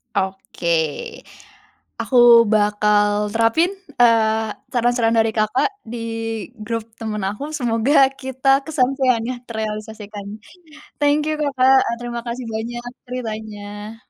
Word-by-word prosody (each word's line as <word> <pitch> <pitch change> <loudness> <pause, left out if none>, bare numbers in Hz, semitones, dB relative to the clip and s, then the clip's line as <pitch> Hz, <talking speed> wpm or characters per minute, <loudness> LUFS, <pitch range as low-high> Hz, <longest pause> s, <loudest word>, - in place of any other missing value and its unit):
Oke, 190 -2 -3 1.3
aku 260 - -3 0.4
bakal 210 0 +3 0.2
terapin, 230 - +2 0.3
eee, 220 -2 +3 0.2
saran-saran 240 -1 +2
dari 225 0 +3
Kakak 215 - +2 0.2
di 240 - -5 0.7
grup 230 -1 -2 0.2
temen 215 -2 -3
aku. 210 +7 -6
Semoga 240 +2 0 0.3
kita 265 +1 -5 0.2
kesampaiannya 255 -4 +1
terealisasikan. 215 -2 -6 0.7
Thank 290 +1 +3
you, 310 - 0
Kakak. 265 -2 +4
E - - -2
terima 240 -1 -4
kasih 240 +1 -4
banyak 240 +2 -4 0.2
ceritanya. 215 -3 -6
230 Hz, 100 wpm, -20 LUFS, 215-255 Hz, 1.3 s, Kakak